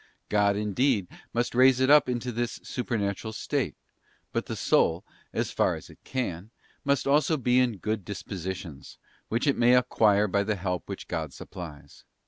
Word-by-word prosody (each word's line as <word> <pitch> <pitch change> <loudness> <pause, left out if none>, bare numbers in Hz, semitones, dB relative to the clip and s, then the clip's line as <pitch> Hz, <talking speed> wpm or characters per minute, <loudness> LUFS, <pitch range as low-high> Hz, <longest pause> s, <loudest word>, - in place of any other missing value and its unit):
God, 100 -1 +3
indeed, 105 0 +1 0.2
must 120 +1 -1
raise 130 +1 +5
it 130 +2 +4
up 150 -3 +6
into 125 0 -2
this 120 +1 -3
supernatural 110 -3 -2
state; - - -2 0.6
but - - -1
the - - -3
soul, - - +2 0.3
so - - 0
far - - +1
as - - -10
it - - -18
can, 105 -7 -3 0.3
must 140 0 +1
also 150 +3 +3
be 125 -1 +3
in 120 -4 +1
good 105 +1 -2
dispositions, 95 -5 -6 0.3
which 115 +5 0
it 140 - +2
may 120 +1 +6
acquire 105 -4 +3
by 100 +1 +1
the 110 +1 -1
help 90 -1 -3
which 100 - -6
God 80 -5 -3
supplies. 75 -5 -10
110 Hz, 165 wpm, -27 LUFS, 95-125 Hz, 0.6 s, up